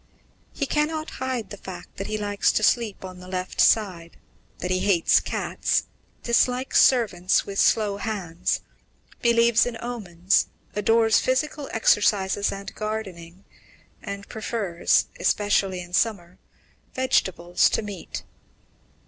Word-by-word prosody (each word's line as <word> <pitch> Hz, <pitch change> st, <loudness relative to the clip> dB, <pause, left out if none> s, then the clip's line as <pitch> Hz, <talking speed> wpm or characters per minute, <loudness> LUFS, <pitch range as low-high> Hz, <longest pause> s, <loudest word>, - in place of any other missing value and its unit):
"He 280 Hz, -, -2 dB
cannot 310 Hz, +2 st, -1 dB
hide 260 Hz, -4 st, -3 dB
the 205 Hz, -, -7 dB
fact 180 Hz, -2 st, -10 dB
that 195 Hz, -, -4 dB
he 215 Hz, -, -2 dB
likes 205 Hz, -1 st, +1 dB
to 215 Hz, -, 0 dB
sleep 215 Hz, -4 st, +1 dB
on 185 Hz, -1 st, -9 dB
the 180 Hz, -, -12 dB
left 185 Hz, 0 st, -2 dB
side, 180 Hz, -6 st, +2 dB, 0.4 s
that 180 Hz, -, -4 dB
he 185 Hz, -, +1 dB
hates 185 Hz, -4 st, +3 dB
cats, -, -, -1 dB, 0.4 s
dislikes 250 Hz, +2 st, +2 dB
servants 200 Hz, -8 st, +3 dB
'with 195 Hz, -1 st, -4 dB
slow 210 Hz, -3 st, +3 dB
hands,' 195 Hz, -6 st, -2 dB, 0.6 s
believes 235 Hz, 0 st, +4 dB
in 235 Hz, -2 st, -5 dB
omens, 195 Hz, -6 st, 0 dB, 0.3 s
adores 225 Hz, +1 st, +3 dB
physical 285 Hz, +2 st, -1 dB
exercises 205 Hz, -2 st, +2 dB
and 195 Hz, 0 st, -7 dB
gardening, 195 Hz, -5 st, -6 dB, 0.6 s
and 200 Hz, -1 st, -7 dB
prefers, 205 Hz, -6 st, 0 dB
especially 195 Hz, -3 st, +1 dB
in 175 Hz, 0 st, -12 dB
summer, 185 Hz, -4 st, -1 dB, 0.6 s
vegetables 180 Hz, -9 st, +2 dB
to -, -, -1 dB
meat." 205 Hz, -4 st, -7 dB
205 Hz, 125 wpm, -24 LUFS, 185-230 Hz, 0.6 s, believes